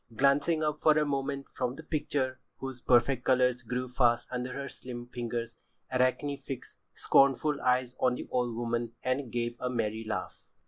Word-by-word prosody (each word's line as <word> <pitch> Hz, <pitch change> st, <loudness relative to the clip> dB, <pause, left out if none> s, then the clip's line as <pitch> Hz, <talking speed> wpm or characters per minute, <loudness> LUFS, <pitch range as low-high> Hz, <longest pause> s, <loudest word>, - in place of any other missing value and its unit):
Glancing 145 Hz, +5 st, +3 dB
up 150 Hz, 0 st, -1 dB
for 155 Hz, -1 st, +5 dB
a 150 Hz, -, +3 dB
moment 140 Hz, -1 st, -2 dB
from 125 Hz, 0 st, -3 dB
the 160 Hz, -, -9 dB
picture 140 Hz, -4 st, -1 dB, 0.2 s
whose 135 Hz, -2 st, -6 dB
perfect 125 Hz, +1 st, +3 dB
colours 125 Hz, -1 st, +3 dB
grew 125 Hz, +2 st, -3 dB
fast 120 Hz, -1 st, +2 dB
under 125 Hz, 0 st, -3 dB
her 140 Hz, +2 st, -4 dB
slim 120 Hz, -2 st, -7 dB
fingers, 120 Hz, -1 st, -4 dB, 0.3 s
Arachne 130 Hz, +3 st, +1 dB
fixed 135 Hz, -3 st, -7 dB, 0.2 s
scornful 140 Hz, +2 st, +3 dB
eyes 125 Hz, 0 st, +1 dB
on 125 Hz, -1 st, +3 dB
the -, -, -6 dB
old 120 Hz, -2 st, 0 dB
woman 120 Hz, 0 st, -2 dB
and 130 Hz, -1 st, -1 dB
gave 120 Hz, 0 st, -1 dB
a 125 Hz, -, -1 dB
merry 110 Hz, -2 st, -1 dB
laugh. 110 Hz, -1 st, -4 dB
125 Hz, 170 wpm, -30 LUFS, 120-140 Hz, 0.3 s, for